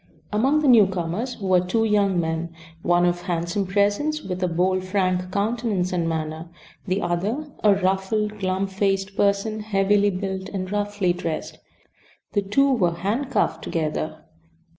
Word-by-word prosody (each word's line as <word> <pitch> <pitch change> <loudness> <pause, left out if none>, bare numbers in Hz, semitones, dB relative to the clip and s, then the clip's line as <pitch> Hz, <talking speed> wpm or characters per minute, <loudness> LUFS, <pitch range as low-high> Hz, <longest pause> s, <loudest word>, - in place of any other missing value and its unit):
Among 270 +8 +3
the - - +3
newcomers 200 0 +2
were 185 -2 +3
two 185 +6 0
young 200 -4 +2
men, 165 0 -2 0.3
one 175 0 +3
of 175 0 0
handsome 175 +3 -2
presence 205 +11 +1
with 185 -1 -4
a 180 - +2
bold, 185 +2 +1
frank 185 -1 0
countenance 205 -3 -1
and 170 -2 0
manner; 160 +1 -4 0.4
the 190 +2 0
other 210 - -2
a 205 -2 +6
ruffled, 195 +3 0
glum 190 0 0
faced 195 0 -1
person, 200 +2 +1
heavily 205 -1 +2
built 190 0 -4
and 185 -1 -4
roughly 205 -3 0
dressed. 165 -2 -5 0.7
The 205 - +2
two 275 +8 +2
were 175 -8 +1
handcuffed 225 +10 -1
together. 155 -1 -3
195 Hz, 140 wpm, -23 LUFS, 180-210 Hz, 0.7 s, a